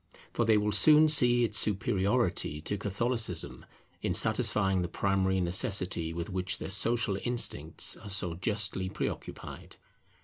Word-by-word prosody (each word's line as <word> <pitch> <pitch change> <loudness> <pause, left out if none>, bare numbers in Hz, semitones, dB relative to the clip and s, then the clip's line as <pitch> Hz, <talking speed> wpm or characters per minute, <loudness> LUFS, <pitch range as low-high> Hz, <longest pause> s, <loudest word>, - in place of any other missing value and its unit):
For 120 - 0
they 110 -1 +3
will 105 0 -1
soon 150 +9 +5
see 120 -5 +6
its 110 -2 0
superiority 95 - -1
to 100 - -3
Catholicism 105 -2 -2 0.3
in - - -1
satisfying 95 -3 +2
the 90 - -3
primary 95 0 -1
necessity 90 -2 -1
with 85 0 -6
which 95 -2 -3
their - - -7
social 105 +1 -1
instincts 100 -10 +1
are 100 - -12
so 95 -3 -2
justly 100 +1 -2
preoccupied. - - -7
100 Hz, 135 wpm, -29 LUFS, 95-115 Hz, 0.3 s, see